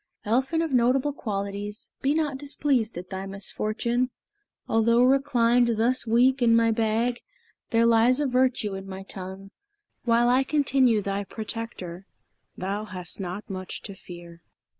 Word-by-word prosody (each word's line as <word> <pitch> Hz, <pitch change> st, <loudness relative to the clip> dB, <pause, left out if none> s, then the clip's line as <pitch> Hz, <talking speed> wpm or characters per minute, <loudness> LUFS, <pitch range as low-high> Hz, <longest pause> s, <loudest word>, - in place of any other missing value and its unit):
Elphin 265 Hz, +9 st, +1 dB
of 320 Hz, -4 st, -3 dB
notable 255 Hz, +4 st, +2 dB
qualities, 205 Hz, -1 st, -5 dB
Be 280 Hz, +2 st, +2 dB
not 295 Hz, -4 st, -1 dB
displeased 275 Hz, -7 st, 0 dB
at 180 Hz, +2 st, -8 dB
thy 190 Hz, 0 st, -4 dB
misfortune: 215 Hz, +5 st, -1 dB, 0.6 s
Although 230 Hz, +2 st, +3 dB
reclined 245 Hz, -3 st, +3 dB
thus 240 Hz, +2 st, +1 dB
weak 250 Hz, +4 st, +3 dB
in 230 Hz, -1 st, +5 dB
my 230 Hz, 0 st, +4 dB
bag, 225 Hz, +2 st, 0 dB, 0.5 s
There 230 Hz, -1 st, +3 dB
lies 235 Hz, +3 st, +4 dB
a 295 Hz, -, +1 dB
virtue 250 Hz, -5 st, +1 dB
in 195 Hz, 0 st, -7 dB
my 190 Hz, 0 st, -7 dB
tongue. 190 Hz, 0 st, -8 dB, 0.5 s
While 235 Hz, 0 st, +3 dB
I 255 Hz, +2 st, +4 dB
continue 265 Hz, -6 st, +2 dB
thy 200 Hz, +1 st, -2 dB
protector 200 Hz, -4 st, -6 dB, 0.5 s
Thou 200 Hz, +3 st, -3 dB
hast 185 Hz, -4 st, -6 dB
not 190 Hz, +2 st, -5 dB
much 185 Hz, -2 st, -6 dB
to 200 Hz, -, -6 dB
fear." 175 Hz, -2 st, -12 dB
230 Hz, 140 wpm, -26 LUFS, 195-255 Hz, 0.6 s, in